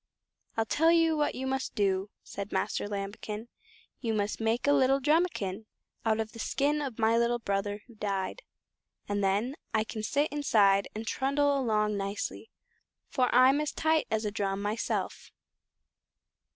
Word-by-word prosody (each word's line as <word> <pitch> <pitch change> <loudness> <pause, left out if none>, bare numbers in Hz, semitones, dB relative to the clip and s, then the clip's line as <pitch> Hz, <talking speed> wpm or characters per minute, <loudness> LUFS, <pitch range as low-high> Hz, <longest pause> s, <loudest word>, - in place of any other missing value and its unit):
"I'll 225 - +2
tell 325 +8 +3
you 330 -1 +4
what 295 -1 0
you 260 - -4
must 265 0 -2
do," 195 -2 +1
said 200 +1 -6
Master - - -1
Lambikin, 210 +2 -5 0.5
"you 225 -3 -1
must 205 +1 -1
make 225 +2 +1
a 285 - +5
little 270 0 +4
drumikin 270 - 0 0.4
out 220 -1 +1
of 220 -1 -2
the 230 - -11
skin 290 +5 0
of 265 -6 -4
my 225 +1 +3
little 235 +1 +2
brother 205 -1 -2
who 240 - -16
died, 200 - -3 0.7
and 205 0 -1
then 205 +8 +1 0.2
I 215 - +3
can 220 0 -6
sit 285 +7 0
inside 205 -9 +3
and 220 +1 -4
trundle 280 +4 +1
along 215 -5 +1
nicely, 200 - -4 0.6
for 255 -2 +1
I'm 260 +4 +5
as 300 - -2
tight 315 0 +1
as 220 0 0
a 210 - -1
drum 195 -1 -1
myself." 210 +3 -2
225 Hz, 160 wpm, -29 LUFS, 205-275 Hz, 0.7 s, a